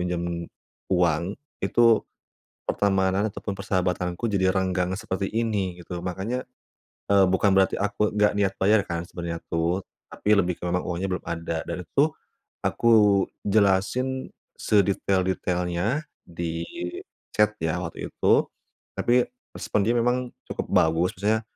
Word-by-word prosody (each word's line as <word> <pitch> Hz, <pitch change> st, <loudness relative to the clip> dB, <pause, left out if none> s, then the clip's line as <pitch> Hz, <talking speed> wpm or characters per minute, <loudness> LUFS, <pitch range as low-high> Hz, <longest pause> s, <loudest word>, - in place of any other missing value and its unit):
pinjam 85 Hz, -1 st, -2 dB, 0.4 s
uang, 90 Hz, +1 st, +1 dB, 0.3 s
itu 115 Hz, -2 st, +4 dB, 0.7 s
pertemanan 95 Hz, +1 st, +2 dB
ataupun 100 Hz, 0 st, -5 dB
persahabatanku 90 Hz, 0 st, -1 dB
jadi 95 Hz, -2 st, +2 dB
renggang 95 Hz, -1 st, 0 dB
seperti 100 Hz, -3 st, -2 dB
ini," 105 Hz, -6 st, -1 dB
gitu. 90 Hz, 0 st, -5 dB
Makanya, 95 Hz, +8 st, -3 dB, 0.6 s
eee, 100 Hz, -1 st, +5 dB
bukan 95 Hz, +1 st, +3 dB
berarti 95 Hz, 0 st, +3 dB
aku 105 Hz, +1 st, 0 dB
nggak 105 Hz, 0 st, +3 dB
niat 100 Hz, -2 st, +1 dB
bayar, 105 Hz, +2 st, +4 dB
kan, 85 Hz, -1 st, -4 dB
sebenernya 85 Hz, -1 st, -5 dB
tuh, 85 Hz, +3 st, 0 dB, 0.3 s
tapi 105 Hz, +1 st, +2 dB
lebih 90 Hz, -3 st, +1 dB
ke 90 Hz, -, -4 dB
memang 90 Hz, +1 st, 0 dB
uangnya 90 Hz, +2 st, -2 dB
belum 90 Hz, -, -3 dB
ada. 85 Hz, -1 st, -3 dB
Dan 90 Hz, -2 st, -5 dB
itu -, -, -56 dB
tuh, 145 Hz, +3 st, +5 dB, 0.6 s
aku 115 Hz, -, +2 dB, 0.6 s
jelasin 105 Hz, +6 st, +1 dB, 0.3 s
sedetail-detailnya, 95 Hz, -, +1 dB, 0.2 s
di 85 Hz, -1 st, -4 dB, 0.7 s
chat 105 Hz, 0 st, +3 dB
ya, 80 Hz, +2 st, -1 dB
waktu 80 Hz, -2 st, -5 dB
itu, -, -, +3 dB, 0.6 s
tapi 125 Hz, +1 st, +3 dB, 0.3 s
respon 105 Hz, -, -1 dB
dia 115 Hz, -, +1 dB
memang 125 Hz, +1 st, +1 dB, 0.2 s
cukup -, -, -3 dB
bagus. 80 Hz, +3 st, +3 dB
Maksudnya, 110 Hz, +3 st, +1 dB
95 Hz, 130 wpm, -25 LUFS, 90-105 Hz, 0.7 s, eee